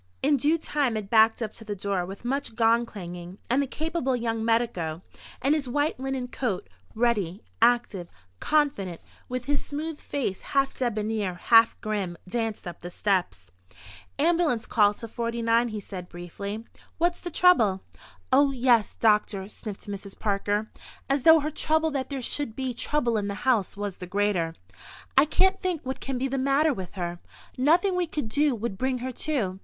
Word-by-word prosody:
In 285 +1 +4
due 300 +6 +2
time 285 -7 0
it 205 -2 -6
backed 225 +1 +5
up 215 - -4
to 225 - -8
the 210 -1 -4
door 195 -2 -2
with 195 +5 -9
much 270 -2 -2
gong 230 +1 +3
clanging, 180 -2 -8
and 265 +3 +4
the 280 - -1
capable 310 -2 -1
young 230 -2 -2
medico, 185 -8 0 0.4
in 275 +3 +4
his 290 -5 -1
white 290 +2 0
linen 265 -1 -2
coat, 240 -7 -3 0.3
ready, 215 -5 0 0.2
active, 235 -6 +2 0.3
confident, 275 - +1 0.3
with 250 0 -3
his 285 0 0
smooth 305 +1 -4
face 250 -10 -3
half 275 -1 +1
debonair, 215 -5 -1
half 225 +6 +5
grim, 200 -5 -2
danced 225 -1 -3
up 175 - -8
the 175 - -6
steps. 175 - -1 0.7
"Ambulance 310 -6 +2
call 205 -2 +3
to 230 - -8
49," 230 +1 +1
he 215 -2 -4
said 185 -3 -8
briefly. 200 +5 -6 0.3
"What's 345 +1 +1
the 350 - -4
trouble?" 230 - +4 0.5
"Oh, 280 +1 +6
yes, 245 -4 +2
doctor," 210 -3 +2
sniffed 210 -1 -8
Mrs. 200 -1 -6
Parker, 205 +1 -1 0.4
as 275 0 +2
though 320 +2 +7
her 305 +2 -2
trouble 315 +1 +1
that 270 -3 -2
there 275 -3 -4
should 275 -3 -1
be 260 -2 -2
trouble 240 -2 0
in 205 -1 -1
the 200 - -3
house 225 -7 +2
was 205 -2 -4
the 180 - -8
greater. 185 -4 0 0.6
"I 270 - +7
can't 380 +5 +2
think 360 -6 -2
what 260 +1 -3
can 270 -1 -3
be 265 +2 0
the 270 0 -2
matter 280 +3 +3
with 185 -6 -7
her. 175 -2 -4 0.4
Nothing 345 +9 +3
we 360 -1 0
could 295 -7 -3
do 290 +2 +2
would 220 -3 -4
bring 260 0 0
her 260 - -2 0.2
to. 195 -11 0
235 Hz, 175 wpm, -26 LUFS, 200-275 Hz, 0.7 s, though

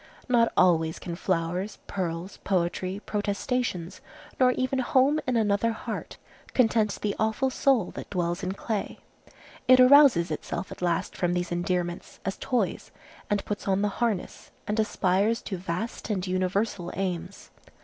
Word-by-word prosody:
Not 235 -2 +3
always 165 -3 +3
can 170 -2 -6
flowers, 180 +2 -1
pearls, 180 0 -4
poetry, 185 +1 -1
protestations, 205 -3 -2 0.4
nor 255 -1 +6
even 255 +1 -1
home 265 +4 +3
in 250 -2 +2
another 215 +1 +2
heart, - - -6 0.4
content 220 -4 +3
the 205 -1 0
awful 220 +5 +1
soul 255 -7 +2
that - - -8
dwells 175 -1 -1
in 185 0 -2
clay. 210 +1 -3 0.7
It 255 0 +7
arouses 255 - +7
itself 170 +3 -4
at - - -9
last 175 -2 0
from 175 -2 0
these 175 0 -2
endearments, 175 0 -2
as 195 - -1
toys, 250 -2 -1 0.4
and 205 -1 0
puts 205 -1 -4
on 195 +1 +2
the 210 - +2
harness 225 -6 -2 0.2
and 210 +1 -1
aspires 210 +1 +2
to 190 - -4
vast 180 +8 -4
and 195 -3 -1
universal 185 0 -1
aims. 185 0 -4
195 Hz, 145 wpm, -27 LUFS, 180-230 Hz, 0.7 s, It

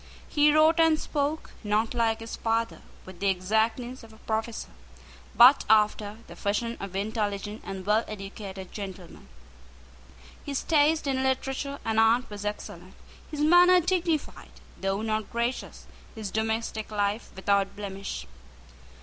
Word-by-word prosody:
He 295 0 +4
wrote 315 +2 +5
and 325 -1 +5
spoke, 295 +1 -2
not, 215 +2 +1
like 225 -2 +1
his 225 - -6
father, 230 0 -1 0.2
with 185 -2 -12
the 200 - 0
exactness 220 +7 0
of 225 - -13
a 220 - -16
professor, 220 +1 -3 0.6
but 255 +4 +8
after 210 -1 +3
the 170 - -12
fashion 210 +6 -1
of 195 -1 -7
intelligent 205 0 -2
and 190 -1 -6
well 210 +2 +3
educated 195 -2 -8
gentlemen. 190 -4 -8 1.2
His 280 -2 -3
taste 310 0 +3
in 265 -2 0
literature 270 +1 -1
and 220 0 +1
art 230 +3 +4
was 205 0 -7
excellent, 185 -3 -6 0.3
his 300 -1 -4
manner 355 +3 +7
dignified, 345 -3 -1 0.2
though 195 +2 -2
not 215 -1 -1
gracious, 235 +2 -3 0.3
his 215 -3 -5
domestic 220 0 -2
life 205 +1 -1
without 195 0 +1
blemish. 195 - -6
220 Hz, 135 wpm, -27 LUFS, 200-265 Hz, 1.2 s, but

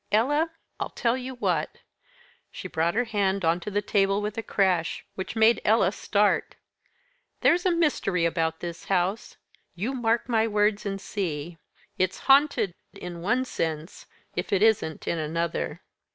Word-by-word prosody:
Ella, 290 +10 +2 0.3
I'll - - -2
tell 235 0 0
you 260 0 -5
what!" 245 - -1 0.7
She - - -7
brought 165 +2 0
her 245 - +3
hand 200 -4 0
on 165 +2 +3
to 180 - -6
the 205 0 -1
table 195 0 +2
with 210 0 -3
a 225 - -2
crash 185 -6 0
which 190 +3 -5
made 225 +1 +4
Ella 210 -4 +4
start, 205 0 +1 0.9
"There's 355 +2 +4
a - - +4
mystery 280 - +1
about 165 -1 0
this 170 -1 -6
house 190 +3 -1 0.4
you 215 +10 -2
mark 235 -2 0
my 225 -2 +2
words 210 -1 +1
and 195 0 -3
see. 170 -5 -4 0.4
It's 185 0 +1
haunted 275 - +4 0.2
in 175 -1 -8
one 245 +8 +1
sense, 160 -7 -4 0.3
if - - -3
it 200 0 +3
isn't 215 -8 +1
in 170 - 0
another." 155 - -2
200 Hz, 155 wpm, -26 LUFS, 175-225 Hz, 0.9 s, made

